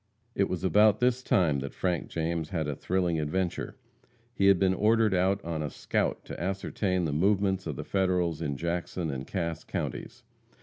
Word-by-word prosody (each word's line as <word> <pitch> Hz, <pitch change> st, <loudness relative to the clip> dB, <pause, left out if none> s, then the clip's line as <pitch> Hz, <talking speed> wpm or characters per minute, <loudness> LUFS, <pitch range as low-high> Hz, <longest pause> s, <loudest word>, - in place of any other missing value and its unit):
It 100 Hz, -3 st, +1 dB
was 90 Hz, -1 st, -3 dB
about 105 Hz, +2 st, +5 dB
this 125 Hz, 0 st, +2 dB
time 85 Hz, -, +2 dB
that 70 Hz, 0 st, -6 dB
Frank 90 Hz, -3 st, -1 dB
James 80 Hz, -1 st, -2 dB
had 80 Hz, -5 st, -2 dB
a 75 Hz, -, -2 dB
thrilling 90 Hz, -1 st, 0 dB
adventure. 85 Hz, -, -2 dB, 0.6 s
He 100 Hz, -5 st, +2 dB
had 100 Hz, -1 st, +6 dB
been 95 Hz, 0 st, +3 dB
ordered 110 Hz, +1 st, +3 dB
out 95 Hz, +1 st, +1 dB
on 80 Hz, -2 st, -2 dB
a 75 Hz, -, -2 dB
scout -, -, -2 dB
to -, -, -7 dB
ascertain 95 Hz, 0 st, -1 dB
the 75 Hz, -, -1 dB
movements 95 Hz, +2 st, +1 dB
of 75 Hz, -, -3 dB
the -, -, -5 dB
Federals 90 Hz, -4 st, 0 dB
in 70 Hz, -1 st, -2 dB
Jackson 85 Hz, 0 st, -2 dB
and 65 Hz, 0 st, -5 dB
Cass 85 Hz, -4 st, -3 dB
counties. 120 Hz, 0 st, -5 dB
90 Hz, 180 wpm, -28 LUFS, 80-100 Hz, 0.6 s, had